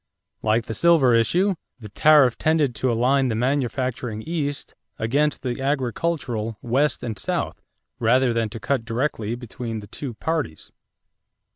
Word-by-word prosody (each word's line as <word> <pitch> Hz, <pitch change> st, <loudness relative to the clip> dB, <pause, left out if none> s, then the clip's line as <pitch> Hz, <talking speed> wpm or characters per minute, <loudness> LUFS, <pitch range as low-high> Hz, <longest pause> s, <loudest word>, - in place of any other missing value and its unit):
Like 110 Hz, +1 st, +1 dB
the 110 Hz, -, -4 dB
silver 150 Hz, -2 st, +4 dB
issue, 175 Hz, -, +3 dB, 0.3 s
the 105 Hz, -3 st, -9 dB
tariff 145 Hz, +1 st, +5 dB
tended 155 Hz, -5 st, +1 dB
to 125 Hz, +2 st, 0 dB
align 130 Hz, +4 st, +2 dB
the 115 Hz, -, -1 dB
manufacturing 125 Hz, -2 st, -1 dB
East 145 Hz, -4 st, -3 dB, 0.2 s
against 145 Hz, +7 st, 0 dB
the 125 Hz, 0 st, -3 dB
agricultural 130 Hz, -4 st, -1 dB
West 135 Hz, +3 st, +1 dB
and 110 Hz, -5 st, -4 dB
South -, -, -2 dB, 0.4 s
rather 120 Hz, +2 st, +3 dB
than 115 Hz, -1 st, 0 dB
to 115 Hz, +1 st, -7 dB
cut 115 Hz, +3 st, -1 dB
directly 115 Hz, -1 st, -2 dB
between 120 Hz, -1 st, -6 dB
the 105 Hz, -, -9 dB
two 125 Hz, +3 st, -7 dB
parties. 155 Hz, -, -3 dB
125 Hz, 140 wpm, -23 LUFS, 115-145 Hz, 0.4 s, tariff